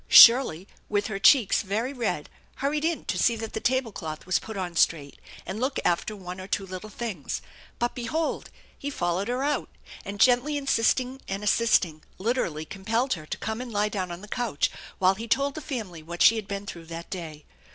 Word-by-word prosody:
Shirley 230 -8 +8 0.2
with 205 -1 +1
her 195 -3 -3
cheeks 230 -1 +6
very 220 +7 -2
red 225 - -2 0.3
hurried 295 +2 -1
in 330 0 0
to - - -1
see 235 - +4
that 225 -1 -6
the - - -2
table 260 0 +1
cloth 155 -5 -6
was 185 0 +2
put 220 -2 -8
on 180 -2 -4
straight, 150 -3 +1 0.3
and 190 +3 -5
look 260 +3 -1
after 175 +5 +1
one 185 -1 -7
or 185 - -8
two 195 0 -1
little 185 +3 -7
things; 210 - -4 0.4
but 240 0 0
behold, 305 +7 -2 0.3
he 285 - -5
followed 180 -5 -1
her 250 +2 -1
out, 290 +1 0 0.3
and, 200 0 -6
gently 255 +5 +4
in 285 - -5
sisting 255 +1 +2
and 195 +1 -3
assisting, 195 -7 +3 0.2
literally 185 -8 -1
compelled 225 - -1
her 155 -4 -7
to - - -4
come 220 +2 -3
and 250 -2 -6
lie 210 0 +1
down 190 -4 -3
on 175 +1 -7
the 210 - -10
couch 230 -9 0 0.3
while 185 0 +4
he 225 +4 -7
told 275 +4 +2
the 310 - -6
family 210 - -5
what 170 +2 -1
she 230 - +8
had 215 -3 -4
been 200 0 -4
through 170 -4 -8
that 165 +1 -8
day. 160 -5 -6
210 Hz, 205 wpm, -27 LUFS, 180-245 Hz, 0.4 s, Shirley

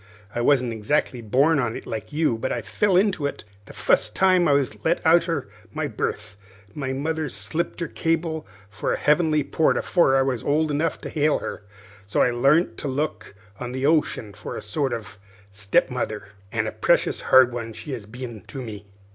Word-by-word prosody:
I 120 - -1
wasn't 125 -2 +3
exactly 120 +3 0
born 140 +8 +3
on 115 -4 -1
it, - - -7
look 110 +5 -5
you, 150 -5 +1
but 115 - -3
I - - -2
fell 200 -3 +2
into 185 -7 +2
it - - -7 0.2
the - - -12
fust - - +1
time 185 -2 +4
I 145 - +4
was 140 -3 0
let 165 +2 +2
out 170 +1 +5
arter 145 -8 -2 0.3
my 155 -1 -2
birth. 105 -3 -4 0.4
My 135 -3 -3
mother 155 +3 -2
slipped 170 +7 -3
her 165 - -1
cable 165 -1 -1 0.2
for 105 +1 -3
a - - -1
heavenly 155 0 +3
port 160 - +2
afore 135 -7 +3
I 135 - +4
was 130 -4 -1
old 155 +1 +1
enough 155 +3 0
to - - -6
hail 150 -1 +2
her; - - -6 0.5
so 100 - +2
I 125 - +2
larnt 140 +8 +3
to - - -4
look 130 -7 -3 0.2
on 125 0 -5
the 130 +1 -2
ocean 145 -9 +1
for 100 - -7
a - - -5
sort 130 +6 -1
of 110 -3 -6 0.3
step 100 +3 +1
mother 110 -5 -4 0.2
an' - - 0
a - - -2
precious - - +1
hard 130 -2 +5
one 115 -2 -4
she 145 +6 -8
has 115 -6 -6
been 120 -1 -8
to 135 - -7
me. 105 -5 -8
135 Hz, 200 wpm, -24 LUFS, 115-155 Hz, 0.5 s, out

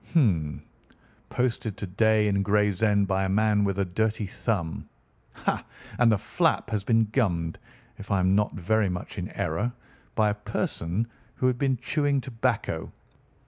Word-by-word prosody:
Hum! 85 - +2 0.7
Posted 120 -4 -1
to - - -4
day 105 +3 +3
in 100 -1 +2
Gravesend 105 0 +2
by 95 0 +1
a - - -1
man 105 +1 +3
with 100 -1 0
a 100 - +1
dirty 110 +4 0
thumb. 95 -4 -3 0.4
Ha! - - -2 0.4
And 120 -2 +6
the 110 - +3
flap 160 - 0
has 105 -3 -1
been 115 +1 +3
gummed, 90 -8 0 0.4
if 100 - -9
I 100 -2 +2
am 95 +1 +3
not 105 +1 +1
very 105 +2 +1
much 90 0 -5
in - - -4
error, 85 +10 -1 0.4
by 105 -1 +3
a - - 0
person 105 -1 -2 0.3
who - - -2
had 125 -1 +2
been 135 -2 +2
chewing 145 +2 +1
tobacco. 125 -3 -2
105 Hz, 160 wpm, -27 LUFS, 95-115 Hz, 0.7 s, And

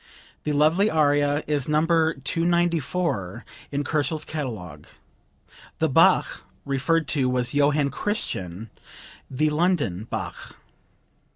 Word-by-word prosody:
The 150 - 0
lovely 155 +8 +3
aria 145 -2 +2
is 145 -2 -1
No. 150 - +3
294 165 - 0 0.3
in 145 0 -1
Kochel's 155 +1 -1
catalogue. 120 - -6 0.9
The - - +1
Bach - - +3 0.2
referred 140 +4 0
to 135 -4 +1
was 125 0 -1
Johann 145 0 +2
Christian, 110 - -4 0.6
the 150 +3 0
"London" 150 - 0
Bach.) - - -6
145 Hz, 100 wpm, -24 LUFS, 135-165 Hz, 0.9 s, lovely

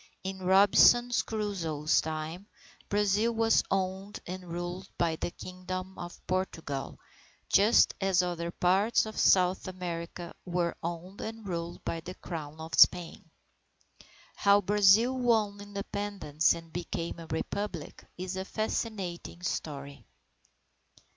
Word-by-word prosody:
In 190 0 -4
Robinson 200 +6 +6 0.2
Crusoe's 175 -9 0
time, 160 +4 -5 0.4
Brazil 210 +3 +2
was 225 0 +3
owned 190 +1 -2
and 185 +1 -6
ruled 175 +2 -5
by 165 -2 +1
the 160 - -3
Kingdom 185 +1 -7
of 175 0 -7
Portugal, 165 -7 -3 0.5
just 210 +4 +5
as 190 -2 +3
other 170 -1 -3
parts 190 +7 +2
of 220 0 -7
South 185 0 +4
America 175 -1 -5
were 175 -1 -1
owned 175 +3 -5
and 220 -1 -6
ruled 170 -1 -5
by 165 - -2
the 180 +3 -8
Crown 155 -2 -7
of 160 +1 -8
Spain. 175 -2 +4 1.1
How 200 0 +5
Brazil 205 +5 +4
won 220 -5 +1
Independence 200 -6 -1
and 165 -1 -11
became 170 -1 -4
a 165 - -9
Republic, 165 +1 -4
is 185 +1 -4
a 190 - -2
fascinating 195 -5 -4
story. 140 -5 -4
185 Hz, 120 wpm, -30 LUFS, 170-200 Hz, 1.1 s, Robinson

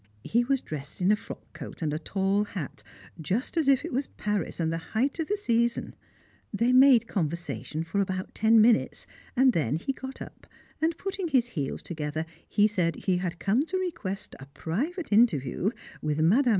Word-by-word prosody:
He 235 +2 +2
was 270 +1 +1
dressed 145 -2 -7
in 185 +2 +3
a - - +5
frock - - -11
coat - - -8
and 150 -2 0
a 155 - -2
tall 195 +4 +1
hat, 185 -8 -6 0.4
just 205 - -2
as 320 -4 +1
if 270 -2 +4
it - - -5
was 270 +2 0
Paris 210 -5 -3
and 165 -1 0
the 165 - -2 0.2
height 270 +7 +1
of 320 - -1
the 415 - 0
season. 235 - 0 0.6
They 230 +4 +2
made 255 -3 +7
conversation 170 -3 -3
for 185 +5 -1
about 185 -1 -3
ten 225 +1 +5
minutes, 220 +1 +3 0.3
and 260 0 +5
then 145 -4 +1
he 180 - -2
got 265 0 -8
up - - -10 0.3
and, 325 +1 +1
putting 385 -1 -3
his 255 -6 +2
heels 145 - -4
together, 155 -1 -3 0.2
he 205 - +4
said 180 -6 +1
he 185 -2 0
had 175 -1 -3
come 215 +9 +2
to 375 - -1
request 220 - -4
a 135 - -10
private 220 - -3
interview 185 - +3 0.3
with 150 -1 -1
Mme. 225 - +4
210 Hz, 190 wpm, -28 LUFS, 165-260 Hz, 0.6 s, made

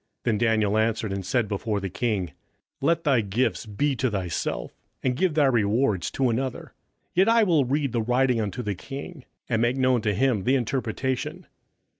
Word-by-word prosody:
27:005:017 - - -58
Then 110 -3 +1
Daniel 110 -2 +2
answered 110 -2 0
and 100 -1 -3
said 110 +4 0
before 105 +1 -2
the 100 - -3
king, 95 -3 -1 0.5
Let 165 0 +2
thy 135 -6 +3
gifts 110 +3 -1
be 135 +7 0
to 130 - +1
thyself, 95 -6 -3 0.3
and 125 -1 +1
give 175 +2 +1
thy 150 -2 +4
rewards 110 -4 +2
to 130 -3 +1
another; 130 +2 -3 0.4
yet 190 +4 +4
I 230 0 +5
will 165 -9 +3
read 140 +1 0
the 115 - 0
writing 125 +1 +2
unto 105 +3 -3
the 105 -2 -1
king, 135 - -8 0.2
and 115 -2 0
make 120 +3 +1
known 130 -2 +3
to 105 -2 0
him 115 -3 +1
the 130 +6 +3
interpretation. 130 0 -2
120 Hz, 185 wpm, -25 LUFS, 105-135 Hz, 0.5 s, I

